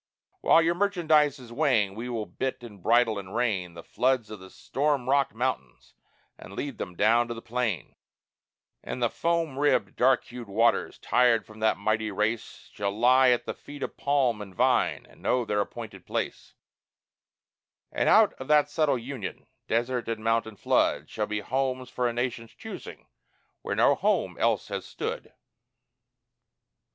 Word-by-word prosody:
While 165 - +5
your 170 +1 +2
merchandise 160 -7 +2
is 120 -3 -12
weighing, 120 -8 +2
we 115 +4 -6
will 115 -3 -3
bit 125 +8 -4
and 105 -5 -11
bridle 115 0 +3
and 95 0 -9
rein 95 -8 -1
The 85 - -9
floods 125 -3 0
of 105 - -7
the 95 0 -12
storm 140 +1 -1
rocked 140 -3 +2
mountains 115 - -3 0.5
and - - -11
lead 140 -5 -5
them 90 - -5
down 115 +5 +3
to 120 - -5
the - - -7
plain; 115 - -2 0.9
And - - -6
the 120 -2 +1
foam 165 -5 -1
ribbed, 145 0 +2
dark 130 0 +3
hued 120 -2 -9
waters, 115 +4 +1
tired 120 -3 +3
from 110 0 -14
that 110 0 +2
mighty 110 +1 0
race, 105 +3 -3
Shall 100 -1 -2
lie 125 +5 +5
at 120 -1 +2
the - - -3
feet 145 0 -10
of - - -5
palm 135 -6 +1
and 95 -3 -10
vine - - +2
and - - -20
know 125 -1 +1
their 105 -1 0
appointed - - -8
place; - - -4 1.4
And - - +1
out - - +6
of 130 - -7
that 150 -1 +4
subtle 150 -4 +2
union, 120 -4 -6 0.2
desert 120 +2 -1
and 110 -1 -3
mountain 115 -1 0
flood, - - +1
Shall 105 -1 -2
be 105 -1 -2
homes 130 0 -2
for 125 -1 0
a 120 - -2
nation's 120 -1 -3
choosing, 225 - -9 0.6
where - - -3
no - - +5
home - - 0
else - - +1
had - - -4
stood. 465 +3 -5
120 Hz, 165 wpm, -27 LUFS, 110-135 Hz, 1.4 s, out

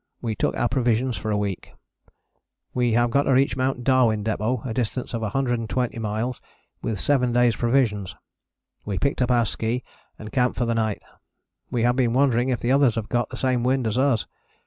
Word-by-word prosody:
We 115 -2 -2
took - - -1
our 120 - +2
provision 125 +1 +1
for 110 +1 -4
a 105 - +1
week. 100 -3 -4 1.0
We 120 -2 +1
have 120 +1 +2
got 140 - +3
to 135 - +3
reach 130 -2 +3
Mt. 130 -1 -1
Darwin 120 -5 +3
Depôt, 110 +3 -1
a 120 - -3
distance 125 +2 -2
of 115 - -2
120 120 +1 -1
miles, 110 +3 -3 0.4
with 110 -4 -3
7 125 -1 +2
days' 120 -1 +3
provisions. 115 -6 0 0.7
We 100 -2 -3
picked 140 -2 0
up 125 - +2
our 120 -2 +3
ski 115 +4 -2 0.3
and 110 0 -9
camped 125 -1 +1
for 120 - +1
the 115 - 0
night. 110 -2 -1 0.7
We 120 -2 -1
have 120 +1 +3
been 120 -3 +2
wondering 130 -2 +2
if 125 -4 -1
the 120 - 0
others 135 -4 +4
have 110 -2 -4
got 120 0 0
the 130 - -7
same 130 -2 +1
wind 130 0 +1
as 110 - -1
us. 130 -5 +2
120 Hz, 195 wpm, -24 LUFS, 110-130 Hz, 1.0 s, others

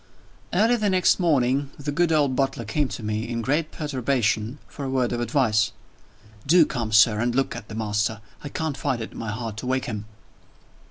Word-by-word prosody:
VIII. - - +2
EARLY 230 +3 +4
the 210 -2 +1
next 185 0 +3
morning, 140 -5 +2
the 145 0 -4
good 170 +3 +2
old 145 -4 +2
butler 135 -3 -1
came 140 +7 0
to 120 - -7
me, 110 +2 -2
in 115 -1 -2
great 150 +5 0
perturbation, 130 -5 -1
for 140 - -8
a 135 - -2
word 130 -2 +1
of 120 0 -2
advice. 115 -4 +2 0.7
"Do 165 +1 +6
come, 115 -6 -3
sir, 105 0 +5
and 120 +1 0
look 135 0 0
at 105 - -8
the 110 - -8
master! 110 0 -1 0.2
I 145 - -5
can't 160 0 -3
find 135 -3 -1
it - - -8
in - - -10
my 110 - -4
heart 110 0 -4
to 125 - -5
wake 130 0 0
him." 105 -3 -5
125 Hz, 210 wpm, -24 LUFS, 110-145 Hz, 0.7 s, Do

